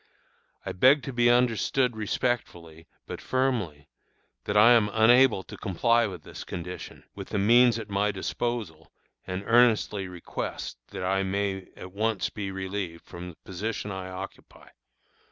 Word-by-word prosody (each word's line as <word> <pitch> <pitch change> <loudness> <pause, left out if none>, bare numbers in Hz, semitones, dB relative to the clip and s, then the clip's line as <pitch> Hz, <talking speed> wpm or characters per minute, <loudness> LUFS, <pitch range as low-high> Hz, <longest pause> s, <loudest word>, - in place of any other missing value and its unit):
I - - -3
beg 130 +8 +4
to 135 - -5
be 120 0 +3
understood 125 +1 +2
respectfully, 100 -8 -3 0.2
but - - -7
firmly, 115 - -1 0.6
that 105 - 0
I 110 +3 +8
am 115 -3 +5
unable 110 -1 +5
to - - -10
comply 115 +4 +1
with 90 -5 -8
this - - -9
condition, 90 +1 -7
with - - -9
the - - -2
means 120 +3 +5
at 110 -3 -6
my 100 0 0
disposal, 100 -4 -4 0.4
and 95 +1 -4
earnestly 115 -4 +3
request 90 -7 -6
that - - -7
I 95 +1 +1
may 95 -1 -2
at 90 - -9
once 110 +2 -1
be 100 -2 -5
relieved 95 -3 -5
from 90 +1 -8
the 85 - -13
position 105 +2 -4
I 95 -1 -6
occupy. 95 0 -10
100 Hz, 150 wpm, -27 LUFS, 95-120 Hz, 0.6 s, I